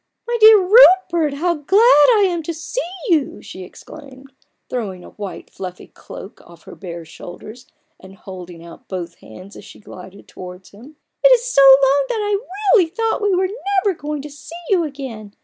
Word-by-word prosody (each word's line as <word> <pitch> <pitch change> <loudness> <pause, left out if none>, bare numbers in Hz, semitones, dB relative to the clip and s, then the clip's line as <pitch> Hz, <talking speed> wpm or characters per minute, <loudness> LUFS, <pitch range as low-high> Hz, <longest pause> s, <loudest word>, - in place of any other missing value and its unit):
" - - -57
My 475 - -2
dear, 435 0 +8
dear 380 - -1
Rupert, 360 - +4
how 345 +4 -1
glad 300 +8 +1 0.4
I 410 -2 +3
am 345 -2 -3
to 330 +1 -6
see 345 +10 -5 0.3
you," 310 -6 0
she 185 - -10
exclaimed, 270 +6 -15 0.3
throwing 195 -7 -6
a - - -14
white 205 -2 -9
fluffy 185 -1 -9
cloak 195 - -13
off 170 -1 -18
her - - -13
bare 170 -3 -9
shoulders, 210 +9 -12 0.3
and 190 +1 -15
holding 180 -3 -12
out 170 - -15
both 175 -3 -7
hands 185 - -14
as - - -12
she - - -15
glided 190 -1 -14
towards 180 0 -12
him. 245 +10 -16
" - - -58
It - - +7
is 480 -1 +1
so - - +2
long, 275 +1 +5
that - - -2
I 415 -1 -1 0.3
really 370 -9 +4
thought 445 +6 -2
we 410 -2 +1
were 370 +1 0 0.4
never 400 - +1
going 295 -2 -6
to 295 - -10
see 295 +3 -13 0.2
you 365 -3 +2
again. 260 -9 -9
275 Hz, 195 wpm, -18 LUFS, -, 0.4 s, dear